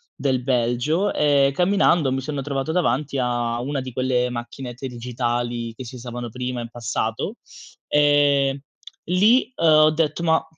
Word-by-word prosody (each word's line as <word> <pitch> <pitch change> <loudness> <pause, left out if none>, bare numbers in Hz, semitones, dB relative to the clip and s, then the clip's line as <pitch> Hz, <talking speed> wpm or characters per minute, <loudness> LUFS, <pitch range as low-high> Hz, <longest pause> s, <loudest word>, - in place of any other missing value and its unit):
del 130 -2 0
Belgio. 130 - 0
Ehm, 140 -2 +3
camminando, 175 -3 +2
mi 135 0 -1
sono 140 0 -4
trovato 140 +2 -3
davanti 140 -4 0
a 120 -1 -1
una 140 +2 -2
di 130 -1 -6
quelle 125 -1 0
macchinette 120 +2 -6
digitali, 120 -1 -3
che 130 - -8
si 115 - -9
usavano 120 -1 -6
prima 125 0 -4
in 115 -1 -6
passato. 115 -1 -3 0.5
Ehm, 145 -2 +3 0.4
lì, 220 +8 +3
uhm, - - -3
ho 155 0 +6
detto 155 +1 -1
ma 160 -1 +2
130 Hz, 145 wpm, -22 LUFS, 120-150 Hz, 0.5 s, ho